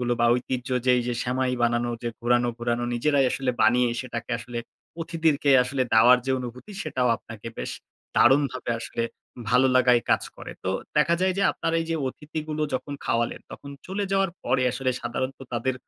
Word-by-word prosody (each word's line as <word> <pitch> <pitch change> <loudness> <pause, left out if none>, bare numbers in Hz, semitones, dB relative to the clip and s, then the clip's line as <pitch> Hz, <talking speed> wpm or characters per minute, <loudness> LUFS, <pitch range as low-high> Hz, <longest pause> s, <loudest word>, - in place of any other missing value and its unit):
গুলো 120 0 0
বা 120 - +5
ঐতিহ্য 125 0 -3 0.2
যে 130 - +4
এইযে 120 0 -2
সেমাই 125 +1 0
বানানো 120 0 +1
যে 120 - -1
ঘোরানো, 120 0 +2
ঘোরানো 120 0 -1
নিজেরাই 140 +3 +2
আসলে 135 -2 -1
বানিয়ে 125 0 +4
সেটাকে 120 -2 -6
আসলে 120 0 -6 0.4
অতিথিদেরকে 160 -3 +1
আসলে 130 +1 -1
দেওয়ার 120 +3 +7
যে - - 0
অনুভূতি, 125 - -8
সেটাও 125 -1 0
আপনাকে 110 0 -11
বেশ - - -3 0.5
দারুণভাবে 130 -1 +3
আসলে 115 - -3 0.5
ভালো 125 +2 +4
লাগাই 125 -1 +5
কাজ - - +3
করে। - - -8
তো 95 - 0 0.3
দেখা 160 +3 +4
যায় 185 0 +2
যে - - +2
আপনার 165 - -2
এই 165 - -2
যে - - +1
অতিথিগুলো 155 +2 -5
যখন 145 +2 -3
খাওয়ালেন, 115 0 0
তখন 140 - -9 0.2
চলে 195 +2 -2
যাওয়ার 195 -1 +2
পরে 130 - +2
আসলে 130 0 -1
সাধারণত 130 +2 -3
তাদের 125 +2 0
125 Hz, 175 wpm, -25 LUFS, 120-145 Hz, 0.5 s, দেওয়ার